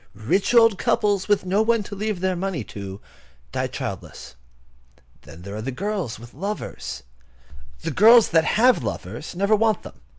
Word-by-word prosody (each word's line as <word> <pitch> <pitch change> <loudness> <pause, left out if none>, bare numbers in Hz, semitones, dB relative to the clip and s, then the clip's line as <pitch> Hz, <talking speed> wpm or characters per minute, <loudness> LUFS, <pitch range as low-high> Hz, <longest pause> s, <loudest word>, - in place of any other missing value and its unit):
Rich 190 - 0
old 225 -4 +5
couples, 205 -3 +1
with 205 -2 +2
no 195 +3 +2
one 225 -1 +2
to 200 - -8
leave 210 -2 -3
their 185 -1 0
money 180 -7 -3
to, 100 -1 -8 0.5
die - - -1
childless. - - -7 0.9
Then 80 +5 -13
there 100 +2 -7
are 110 - -5
girls 170 - -3
with 120 +1 -13
lovers. 195 - -5 0.8
The - - -2
girls 230 +3 +6
that 165 -1 +4
have 245 - +5
lovers 110 - -6
never 200 +4 +3
want 220 0 +1
them. - - -12
195 Hz, 160 wpm, -23 LUFS, -, 0.9 s, girls